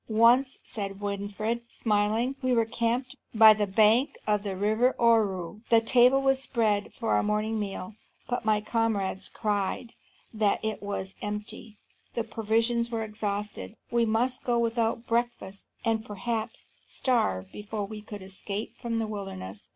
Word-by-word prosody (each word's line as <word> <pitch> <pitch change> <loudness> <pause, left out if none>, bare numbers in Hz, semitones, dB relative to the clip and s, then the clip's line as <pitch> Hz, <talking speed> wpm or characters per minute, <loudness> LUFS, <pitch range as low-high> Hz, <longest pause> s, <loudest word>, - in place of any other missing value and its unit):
"Once," 240 +4 +4
said 195 -2 -4
Winfried, 205 +3 -2
smiling, 220 +4 +1
"we 255 -1 +1
were 230 -2 +3
camped 240 +4 -1 0.2
by 220 0 +9
the 210 -1 -1
bank 220 +6 +3
of 210 -1 +2
the 195 -2 -4
river 220 +6 +2
Ohru. 210 -5 +2
The 230 - +7
table 250 +3 +4
was 270 0 +3
spread 220 -6 0
for 230 - 0
the - - +3
morning 215 +1 0
meal, 195 0 -5 0.3
but 245 0 -2
my 215 -1 +2
comrades 210 -4 -1
cried 210 +2 -2 0.4
that 215 -2 +2
it 220 -1 -2
was 200 -1 -4
empty; 210 +1 -6 0.4
the 235 - 0
provisions 230 +2 0
were 225 -1 -2
exhausted; 210 0 -4 0.2
we 235 -1 +2
must 245 +4 0
go 240 -1 +1
without 230 0 0
breakfast, 230 -4 -2 0.2
and 225 -1 +1
perhaps 220 +2 -4
starve 95 - 0
before 210 0 -4
we 210 +1 -8
could 205 -2 -9
escape 195 +2 -5
from 235 -2 -3
the 225 - 0
wilderness. 200 -1 -7
220 Hz, 150 wpm, -28 LUFS, 205-235 Hz, 0.4 s, by